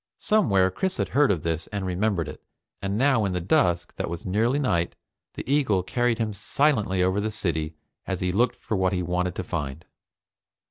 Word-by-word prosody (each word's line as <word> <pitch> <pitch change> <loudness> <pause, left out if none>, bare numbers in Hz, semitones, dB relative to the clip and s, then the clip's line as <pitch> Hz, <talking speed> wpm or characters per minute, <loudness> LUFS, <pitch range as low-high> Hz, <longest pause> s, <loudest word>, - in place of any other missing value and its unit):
Somewhere, 100 - +3
Chris 190 - -2
had - - -1
heard 145 0 +4
of 90 -6 0
this 80 0 -2
and 100 -2 -4
remembered 95 -3 0
it, - - -8 0.4
and 100 +1 -1
now 130 -3 +3
in 95 -2 0
the 90 - 0
dusk 85 -1 +1
that - - -2
was 85 -1 -6
nearly 115 +8 +1
night, 85 -12 0 0.4
the - - -6
eagle 130 -10 +2
carried 120 +3 +1
him 110 -2 -1
silently 105 -4 +1
over 95 +2 +1
the 110 - -1
city 80 -6 -2 0.3
as 95 - -2
he 90 0 0
looked 120 +5 +2
for 110 - -4
what 95 -1 +1
he 90 -1 0
wanted 90 +1 -1
to - - -3
find. 75 -7 -4
95 Hz, 195 wpm, -25 LUFS, 90-115 Hz, 0.4 s, heard